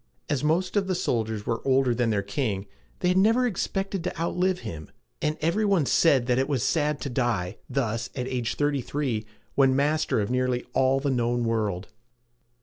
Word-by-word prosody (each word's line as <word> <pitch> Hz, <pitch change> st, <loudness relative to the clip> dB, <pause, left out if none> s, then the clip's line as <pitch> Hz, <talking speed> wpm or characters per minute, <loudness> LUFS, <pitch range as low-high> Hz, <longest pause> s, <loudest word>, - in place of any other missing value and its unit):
As 145 Hz, -1 st, 0 dB
most 175 Hz, +6 st, +1 dB
of 200 Hz, -2 st, +2 dB
the 185 Hz, -, 0 dB
soldiers 110 Hz, -, -1 dB
were 115 Hz, -1 st, -1 dB
older 135 Hz, -2 st, +3 dB
than 120 Hz, -1 st, +1 dB
their 100 Hz, -2 st, +1 dB
king, 100 Hz, -2 st, -2 dB, 0.4 s
they 180 Hz, -, +2 dB
had 180 Hz, -, +2 dB
never 225 Hz, +5 st, +4 dB
expected 195 Hz, -3 st, -2 dB
to 180 Hz, -2 st, -4 dB
outlive 180 Hz, +2 st, 0 dB
him; 75 Hz, -2 st, -7 dB, 0.3 s
and 155 Hz, +1 st, 0 dB
every 170 Hz, +7 st, +1 dB
one 195 Hz, -7 st, +3 dB
said 135 Hz, -4 st, +4 dB
that 125 Hz, 0 st, +2 dB
it 135 Hz, -, 0 dB
was 135 Hz, -6 st, 0 dB
sad 150 Hz, -2 st, +1 dB
to 140 Hz, -, -3 dB
die 110 Hz, -7 st, -1 dB
thus, 115 Hz, -4 st, -1 dB
at 125 Hz, -1 st, -3 dB, 0.2 s
thirty 145 Hz, +1 st, 0 dB
three, 120 Hz, -6 st, -2 dB, 0.3 s
when 135 Hz, -1 st, +4 dB
master 150 Hz, -1 st, +1 dB
of 105 Hz, +2 st, -1 dB
nearly 125 Hz, -1 st, 0 dB
all 130 Hz, +1 st, +3 dB
the 140 Hz, 0 st, 0 dB
known 120 Hz, -1 st, 0 dB
world. 105 Hz, -5 st, -1 dB
135 Hz, 185 wpm, -26 LUFS, 115-160 Hz, 0.4 s, never